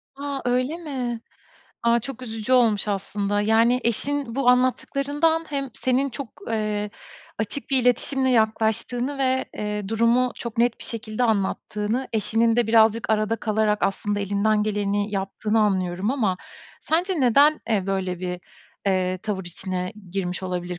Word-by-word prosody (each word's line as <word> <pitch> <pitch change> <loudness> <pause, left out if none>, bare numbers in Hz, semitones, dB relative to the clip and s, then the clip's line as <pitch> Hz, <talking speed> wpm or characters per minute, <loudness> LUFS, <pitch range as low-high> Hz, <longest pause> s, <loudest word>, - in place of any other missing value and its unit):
A, 280 0 -4
öyle 255 +6 0
mi? 260 -8 -4 0.6
A, 235 0 +4
çok 255 +1 -8
üzücü 225 0 -4
olmuş 225 -5 +3
aslında. 205 +1 -1
Yani 225 +4 +3
eşin 265 +2 0
bu 270 -1 +1
anlattıklarından 280 +5 +2
hem 275 -2 -3
senin 260 +2 +1
çok, 260 +1 -6 0.2
ııı, 215 -2 -1 0.5
açık 220 +8 -3
bir 265 -2 +4
iletişimle 260 +2 +2
yaklaştığını 235 +3 0
ve, 260 -1 +1
eee, 210 -1 -3
durumu 235 +3 +2
çok 235 -1 -7
net 240 0 +2
bir - - -5
şekilde 225 0 -4
anlattığını, 215 +2 -1
eşinin 225 +2 +2
de 240 -2 +3
birazcık 225 0 +4
arada 215 +1 +1
kalarak 215 -1 0
aslında 205 +1 0
elinden 205 +2 +1
geleni 205 0 -1
yaptığını 210 +2 -1
anlıyorum 190 -1 +1
ama 220 -9 0 0.4
sence 345 +1 0
neden, 280 +5 +5
eee, 205 -5 +1
böyle 190 -2 -2
bir, 180 -1 -4 0.5
eee, 185 -1 +1
tavır 205 -4 -3
içine 180 +1 -4 0.2
girmiş 185 -1 -3
olabilir 180 -1 -4
220 Hz, 140 wpm, -24 LUFS, 205-255 Hz, 0.6 s, neden